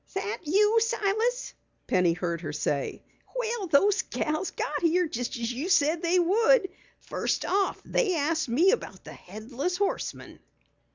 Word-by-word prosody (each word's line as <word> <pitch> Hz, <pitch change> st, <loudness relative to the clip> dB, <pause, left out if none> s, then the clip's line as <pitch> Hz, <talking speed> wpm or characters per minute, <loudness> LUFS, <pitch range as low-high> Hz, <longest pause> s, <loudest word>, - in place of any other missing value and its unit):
"That 405 Hz, +2 st, -3 dB
you, 420 Hz, +7 st, +4 dB
Silas?" 460 Hz, +2 st, 0 dB, 0.3 s
Penny 180 Hz, -2 st, +2 dB
heard 170 Hz, -1 st, -3 dB
her 155 Hz, -4 st, -5 dB
say. 145 Hz, -2 st, -2 dB, 0.3 s
"Well, 470 Hz, -5 st, -2 dB
those 380 Hz, +7 st, +3 dB
gals 310 Hz, +5 st, -2 dB
got -, -, -3 dB
here, 345 Hz, +1 st, +2 dB
just 245 Hz, -4 st, -4 dB
as 235 Hz, +1 st, -3 dB
you 285 Hz, +9 st, -4 dB
said 320 Hz, -2 st, +3 dB
they 350 Hz, +1 st, +2 dB
would! 410 Hz, +4 st, +3 dB, 0.3 s
First -, -, -2 dB
off 395 Hz, 0 st, 0 dB
they 400 Hz, -8 st, +1 dB
asked 315 Hz, -1 st, 0 dB
me 325 Hz, +12 st, +4 dB
about -, -, -4 dB
the -, -, -10 dB
Headless 240 Hz, -, -5 dB
Horseman." 400 Hz, 0 st, -3 dB
350 Hz, 150 wpm, -27 LUFS, 250-410 Hz, 0.3 s, you